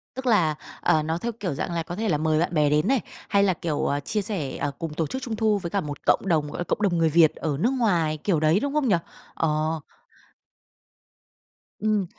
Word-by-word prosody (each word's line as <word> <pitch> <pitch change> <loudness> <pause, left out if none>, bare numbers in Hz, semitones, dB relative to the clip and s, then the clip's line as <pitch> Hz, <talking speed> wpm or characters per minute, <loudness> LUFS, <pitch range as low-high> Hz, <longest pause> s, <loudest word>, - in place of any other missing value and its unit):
Tức 260 - -6
là, 175 -10 +3 0.3
ờ, 155 -1 +3
nó 160 +2 -1
theo 235 +6 -3
kiểu 180 -7 -2
dạng 175 - -3
là 165 - -1
có 175 +2 -6
thể 220 0 -1
là 150 - +2
mời 155 0 +1
bạn 175 +1 0
bè 150 -2 +3
đến 150 +1 +2
này, 265 -3 +3 0.3
hay 200 -1 +4
là, 190 -2 +3
kiểu, 160 -3 -2
ờ, 145 0 0
chia 210 +8 -2
sẻ, 185 -9 -3
ờ, 145 - -2
cùng 165 -2 -4
tổ 160 -1 -1
chức 260 - -5
Trung 225 -3 -3
thu 215 -2 +2
với 175 -3 -4
cả 200 +2 0
một 145 -2 -5
cộng - - +3
đồng, 155 -4 +1
gọi - - -6
là, - - 0
cộng 205 - -2
đồng 190 -4 +2
người 165 -1 +3
Việt 160 0 +5
ở 150 -3 -2
nước 245 +7 +2
ngoài, 170 -11 +1
kiểu 170 0 0
đấy, 155 +5 +3
đúng 285 +1 -2
không 300 -4 +1
nhỉ? 195 - +4 0.4
Ờ. 155 0 0 2.0
Ừm. 210 -2 +1
170 Hz, 240 wpm, -25 LUFS, 155-210 Hz, 2.0 s, Việt